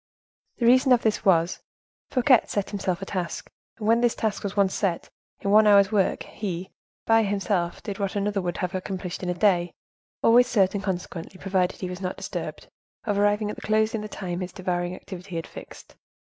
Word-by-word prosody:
The 235 - 0
reason 255 +2 +5
of 240 - +2
this 220 -2 +1
was, 170 -2 +2 0.5
Fouquet 255 -1 +5
set 205 -2 -3
himself 195 -2 -2
a - - -4
task, 180 -3 -4 0.3
and 215 -2 -4
when 230 +1 +4
this 240 -1 +2
task 220 -2 -1
was 200 0 -5
once 195 -1 +3
set, 185 -5 -2 0.3
in 200 - -1
one 215 +1 +6
hour's 200 -1 +6
work 200 -3 +1
he, 190 -3 -5 0.3
by 225 0 +5
himself, 195 -4 -1
did 200 -1 -5
what 195 0 -2
another 205 0 0
would 175 -1 -3
not - - -5
have 180 0 -2
accomplished 185 -1 -4
in 180 - -3
a 180 - -1
day; 175 -2 +2 0.5
always 245 +2 +6
certain, 200 -4 +2
consequently, 185 -1 -5
provided 185 -2 0
he 185 - -3
was 180 +1 -7
not 185 -1 -3
disturbed, - - -6 0.4
of 205 -3 0
arriving 205 +1 +2
at - - -9
the - - -9
close 215 0 +1
in 220 - -2
the 215 - -5
time 180 -4 -4
his 180 -1 -4
devouring 180 -1 -2
activity 185 -1 -9
had 165 - -3
fixed. - - -12
195 Hz, 200 wpm, -25 LUFS, 180-215 Hz, 0.5 s, one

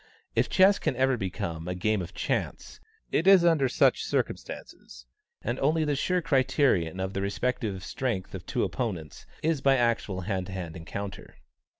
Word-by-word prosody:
If - - +2
chess 190 +1 +5
can - - -1
ever 130 +1 +2
become 85 -5 -4
a 90 - -2
game 105 +2 0
of 90 +1 -8
chance, - - -3 0.3
it 165 - +1
is 190 -3 +7
under 155 -6 +4
such - - +3
circumstances; - - -4 0.4
and 120 +3 -2
the - - -7
only 150 0 +2
sure 180 +5 0
criterion 130 - +2
of 95 +1 -2
the 95 - -2
respective 100 -1 -2
strengths 115 -7 -3
of 95 -2 -6
two 120 - 0
opponents 95 - -4 0.2
is 160 -3 +1
by 135 -1 +4
actual 115 -6 0
hand 95 -1 -2
to 95 - -7
hand 90 -4 -5
encounter. 95 +4 -7
110 Hz, 170 wpm, -28 LUFS, 95-135 Hz, 0.4 s, is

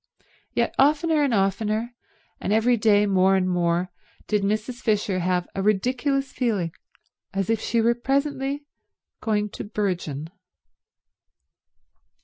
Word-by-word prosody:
Yet - - +1
oftener 300 +3 +3
and 280 -3 +2
oftener, 215 +3 0 0.5
and 195 - -3
every 225 +3 +4
day 210 -2 +4
more 190 -1 +3
and 185 -1 +1
more, 175 0 0 0.3
did 210 -1 +1
Mrs. 215 +5 -2
Fisher 205 -3 +1
have 180 0 0
a 195 - -2
ridiculous 255 +7 +1
feeling 205 -10 -1 0.6
as 195 +2 0
if 225 - +1
she 230 - +1
were 235 +1 +4
presently 275 +2 -1 0.6
going 210 -2 0
to - - -7
burgeon. 175 -8 -3
215 Hz, 125 wpm, -24 LUFS, 190-245 Hz, 0.6 s, every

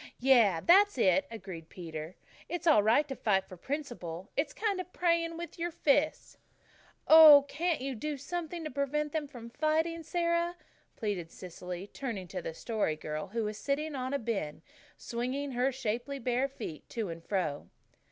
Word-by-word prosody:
"Yes, 235 -10 +4
that's 400 0 +6
it," 235 +6 +3
agreed 185 -7 -8
Peter. 160 -1 -7 0.3
"It's 350 0 -4
all 310 -10 +6
right 230 +8 +3
to 270 - -5
fight 195 -5 +1
for 185 - -10
principle. 195 - -5
It's 285 +1 0
kind 410 -4 -1
of 365 - -12
praying 335 -2 +1
with 340 +1 -8
your 345 +1 -1
fists." 300 -1 0 0.7
"Oh, 310 -3 +10
can't 325 0 -1
you 270 +1 -3
do 290 +5 -4
something 340 +3 -5
to 310 - -5
prevent 285 +2 -1
them 305 -2 -2
from 235 -4 -10
fighting, 320 +4 0
Sara?" 340 +1 0 0.4
pleaded 195 -6 -3
Cecily, 180 +1 -7
turning 205 -5 -5
to 185 - -4
the 160 - -6
Story 215 -6 -1
Girl, 155 0 -5
who 225 +3 -2
was 210 0 -4
sitting 300 +2 -1
on 260 -1 -3
a 280 - +1
bin, 200 - -3 0.3
swinging 255 +4 -3
her 255 +2 +1
shapely 245 +2 -3
bare 255 +1 0
feet 225 - -8
to 220 -5 -3
and 165 0 -7
fro. 170 -8 -2
265 Hz, 170 wpm, -31 LUFS, 195-310 Hz, 0.7 s, Oh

